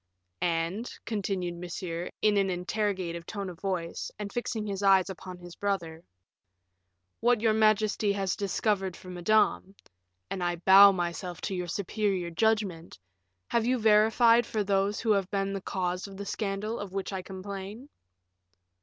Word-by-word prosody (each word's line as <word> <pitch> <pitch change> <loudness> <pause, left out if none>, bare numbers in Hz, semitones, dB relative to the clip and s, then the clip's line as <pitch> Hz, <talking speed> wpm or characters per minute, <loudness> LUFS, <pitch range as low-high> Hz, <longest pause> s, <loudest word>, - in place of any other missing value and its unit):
"And," 170 +7 -1
continued 190 -5 -2
Monsieur, 175 -1 -5
in 210 -1 +4
an 195 -1 +2
interrogative 180 -2 -2
tone 200 -3 -4
of 170 - -14
voice, 185 -4 -3
and 200 -1 -6
fixing 230 -3 -2
his 200 -1 -3
eyes 195 -1 +4
upon 185 0 -9
his 175 -1 -11
brother, 170 -5 -3 1.2
"what 240 -1 +3
your 220 0 +3
majesty 215 -1 +3
has 195 -2 -1
discovered 195 -2 -1
for 185 - -12
Madame 195 +1 +1 0.5
and 190 -2 -4
I 175 0 0
bow 195 +3 +8
myself 175 -1 -3
to 200 - -3
your 180 -1 -3
superior 195 -1 -1
judgment 200 - 0 0.5
have 235 0 +1
you 255 +1 +2
verified 225 +2 +5
for 215 -2 -1
those 200 +1 +1
who 225 - +1
have 200 -2 +1
been 195 -1 -1
the 195 - -3
cause 180 0 -2
of 195 -1 -11
the 200 - -6
scandal 210 +2 -3
of 200 -2 -7
which 195 0 -3
I 190 - -3
complain?" 195 +5 -7
195 Hz, 155 wpm, -29 LUFS, 180-210 Hz, 1.2 s, bow